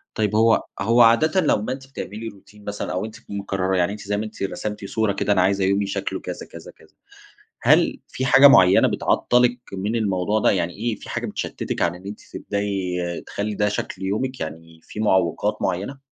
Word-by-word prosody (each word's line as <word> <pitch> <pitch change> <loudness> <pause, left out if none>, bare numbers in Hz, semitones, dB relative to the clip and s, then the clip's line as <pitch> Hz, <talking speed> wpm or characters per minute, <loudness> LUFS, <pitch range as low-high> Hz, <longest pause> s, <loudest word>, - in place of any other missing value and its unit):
طيب 105 -1 0
هو 115 +1 +4 0.2
هو 115 +3 +4
عادةً 155 +11 +5
لمّا 125 - +1
أنتِ 135 0 -10
بتعملي 115 -4 -7
روتين 105 0 -13
مثلًا 105 0 -4
أو 90 +4 -2
أنتِ 110 - -9
تكوني 100 0 -7
مقررة، 95 -1 -1
يعني 90 0 +1
أنتِ 105 0 -7
زي 105 +1 -2
ما 110 - -2
أنتِ 105 - -7
رسمتي 105 +1 -4
صورة 110 -1 0
كده، 100 +1 +1
أنا 95 - +3
عايزة 95 +1 +2
يومي 100 +1 +1
شكله - - -3
كذا، - - -7
كذا، - - -12
كذا. - - -23 0.7
هل - - +3
في 130 - -3
حاجة 140 +2 +8
مُعيّنة 95 -8 +6
بتعطلِك 125 0 +2
من 100 +4 -2
الموضوع 105 -1 0
ده؟ - - +4
يعني 90 -2 0
إيه، 115 +2 -2
في - - -13
حاجة - - -3
بتشتتِك - - -4
على 85 0 +1
إن 95 - -14
أنتِ 105 - -7
تبدأي 100 -3 -3 0.3
تخلّي 105 +1 -3
ده 105 +1 +1
شكل 95 -2 -4
يومِك، 125 +7 -2
يعني 80 +1 -8
في 105 - -8
معوقات 95 -6 +1
مُعيّنة؟ 120 +10 -3
105 Hz, 195 wpm, -22 LUFS, 95-115 Hz, 0.7 s, حاجة